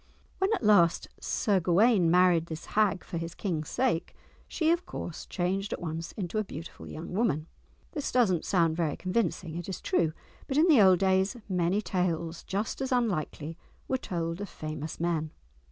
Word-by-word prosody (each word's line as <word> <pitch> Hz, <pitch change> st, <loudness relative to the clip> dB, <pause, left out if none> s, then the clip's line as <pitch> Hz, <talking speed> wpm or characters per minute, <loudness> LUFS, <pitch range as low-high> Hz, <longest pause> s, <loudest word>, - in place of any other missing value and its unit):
When 385 Hz, +2 st, +2 dB
at 415 Hz, -, -1 dB
last 180 Hz, -6 st, +4 dB
Sir 200 Hz, -3 st, +1 dB
Gawaine 185 Hz, +1 st, +4 dB
married 175 Hz, -1 st, +4 dB
this 160 Hz, 0 st, -6 dB
hag 210 Hz, -3 st, +2 dB
for 170 Hz, -, -5 dB
his 165 Hz, 0 st, -5 dB
King's 160 Hz, -6 st, -3 dB
sake, 245 Hz, -10 st, 0 dB, 0.3 s
she, 320 Hz, -1 st, +1 dB
of 345 Hz, +1 st, 0 dB
course, 170 Hz, -, -6 dB
changed 190 Hz, +3 st, -1 dB
at -, -, -4 dB
once 165 Hz, 0 st, -4 dB
into 195 Hz, +1 st, -3 dB
a -, -, +1 dB
beautiful 165 Hz, -4 st, -9 dB
young 160 Hz, +3 st, -7 dB
woman! 185 Hz, -8 st, +1 dB, 0.5 s
This 295 Hz, -5 st, -3 dB
does 245 Hz, -6 st, +4 dB
not 170 Hz, -3 st, 0 dB
sound 165 Hz, -4 st, +2 dB
very 160 Hz, -3 st, -1 dB
convincing, 185 Hz, -4 st, -1 dB
it 175 Hz, +2 st, -6 dB
is 190 Hz, -, -4 dB
true, 160 Hz, -2 st, +1 dB, 0.3 s
but 270 Hz, -, -1 dB
in 320 Hz, +3 st, +5 dB
the 295 Hz, -10 st, +7 dB
old 190 Hz, -2 st, +7 dB
days 190 Hz, +4 st, +2 dB
many 185 Hz, +2 st, +1 dB
tales 170 Hz, -3 st, -1 dB
just 205 Hz, +6 st, -3 dB
as 265 Hz, -, -2 dB
unlikely 165 Hz, -, -1 dB, 0.3 s
were 260 Hz, -, 0 dB
told 170 Hz, -2 st, -3 dB
of 205 Hz, -, -5 dB
famous 155 Hz, 0 st, -6 dB
men. 165 Hz, -2 st, 0 dB
180 Hz, 180 wpm, -29 LUFS, 165-210 Hz, 0.5 s, the